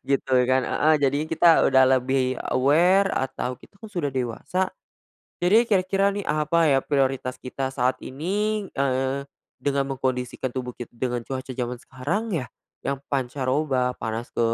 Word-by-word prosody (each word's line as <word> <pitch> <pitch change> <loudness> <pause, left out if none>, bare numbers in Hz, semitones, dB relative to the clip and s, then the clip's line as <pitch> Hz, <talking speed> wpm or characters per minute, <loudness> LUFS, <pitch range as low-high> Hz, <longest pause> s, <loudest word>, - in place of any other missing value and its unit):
Gitu 135 -1 0 0.2
kan? 130 0 +3
Heeh. 155 +1 +3
Jadi, 140 -1 +2
kita 165 0 +5
udah 130 -1 +5 0.2
lebih 130 0 0 0.2
aware 175 +9 +4
atau 130 -1 -2
kita 200 - -20
kan 220 - -10
sudah 170 -8 -2
dewasa, 135 +9 -2 0.7
jadi 200 +6 +5
kira-kira 195 0 +2
nih, 200 0 -4
apa 155 +2 +2
ya 135 - +4
prioritas 135 -2 0
kita 130 +1 -4
saat 130 0 +1
ini, 205 +9 -2
eee, 135 0 0 0.4
dengan 140 -1 0
mengkondisikan 130 0 -2
tubuh 125 -1 -4
kit 120 - -8
dengan 120 0 -2
cuaca 130 +1 -5
zaman 125 0 -3
sekarang 160 - -3
ya? 135 -7 -2 0.3
Yang 140 0 -2
pancaroba, 130 0 0
panas 110 +1 -4
ke - - -2
135 Hz, 150 wpm, -24 LUFS, 130-165 Hz, 0.7 s, kita